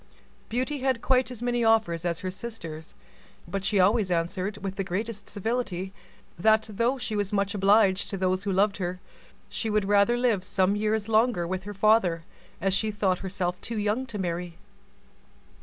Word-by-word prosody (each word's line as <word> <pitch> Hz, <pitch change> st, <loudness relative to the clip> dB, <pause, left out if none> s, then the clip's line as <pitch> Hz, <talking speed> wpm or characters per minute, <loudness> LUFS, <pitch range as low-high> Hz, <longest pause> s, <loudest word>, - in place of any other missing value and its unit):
Beauty 260 Hz, +5 st, -1 dB
had 260 Hz, -3 st, 0 dB
quite 260 Hz, -1 st, +3 dB
as 245 Hz, -2 st, -8 dB
many 240 Hz, -1 st, +1 dB
offers 215 Hz, -7 st, +2 dB
as 170 Hz, -1 st, -1 dB
her 185 Hz, -, -3 dB
sisters, 165 Hz, -7 st, -8 dB, 0.5 s
but 195 Hz, +2 st, -3 dB
she 200 Hz, 0 st, +1 dB
always 200 Hz, +1 st, +3 dB
answered, 185 Hz, +4 st, -1 dB
with 195 Hz, -1 st, -5 dB
the 195 Hz, -, -2 dB
greatest 205 Hz, +3 st, -4 dB
civility, 205 Hz, -3 st, -2 dB, 0.5 s
that 220 Hz, +3 st, +4 dB
though 235 Hz, +6 st, +1 dB
she 235 Hz, -4 st, -3 dB
was 205 Hz, -2 st, -1 dB
much 200 Hz, 0 st, 0 dB
obliged 200 Hz, -1 st, +3 dB
to 195 Hz, -, -3 dB
her 185 Hz, 0 st, +1 dB, 0.2 s
lovers, 190 Hz, -2 st, +1 dB, 0.5 s
she 225 Hz, -, -3 dB
would 210 Hz, -1 st, +1 dB
rather 205 Hz, +4 st, +4 dB
live 235 Hz, -6 st, +1 dB
some 190 Hz, +1 st, +1 dB
years 215 Hz, 0 st, 0 dB
longer 225 Hz, -4 st, +2 dB
with 185 Hz, +2 st, -4 dB
her 205 Hz, 0 st, -7 dB
father, 195 Hz, -5 st, +3 dB, 0.4 s
as 190 Hz, +2 st, +1 dB
she 215 Hz, +3 st, +2 dB
thought 200 Hz, -3 st, 0 dB
herself 185 Hz, -2 st, -3 dB
too 230 Hz, -1 st, -3 dB
young 215 Hz, +5 st, 0 dB
to 230 Hz, -4 st, -6 dB
marry. 175 Hz, -2 st, -3 dB
205 Hz, 170 wpm, -27 LUFS, 185-225 Hz, 0.5 s, that